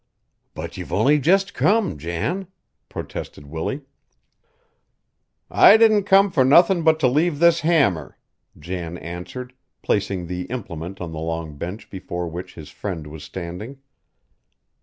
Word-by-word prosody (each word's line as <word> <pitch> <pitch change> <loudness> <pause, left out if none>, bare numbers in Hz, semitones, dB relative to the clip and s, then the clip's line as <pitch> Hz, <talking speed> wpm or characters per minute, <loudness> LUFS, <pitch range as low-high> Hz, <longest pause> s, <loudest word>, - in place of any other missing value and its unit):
"But - - -6
you've - - -7
only 150 +2 +3
just 195 +7 +2
come, 205 - +1
Jan," 85 - -3 0.4
protested 75 - -7
Willie. 80 - -4 1.7
"I - - +7
didn't 215 -3 +4
come 195 0 +5
fur 135 -6 +3
nothin' 170 +7 +5
but 160 -1 +3
to 130 - +5
leave 150 +5 +1
this 170 +1 +5
hammer," 140 - +1 0.4
Jan 85 +1 -5
answered, 90 - -7 0.3
placing 100 -3 -1
the 90 +1 -4
implement 95 -6 -6
on 85 -2 -5
the 80 - -6
long 80 -1 -4
bench 90 +9 -7
before 90 -2 -5
which 85 +2 -7
his 80 -3 -10
friend 90 -7 -5
was 75 0 -9
standing. 95 +9 -7
100 Hz, 135 wpm, -22 LUFS, -, 1.7 s, I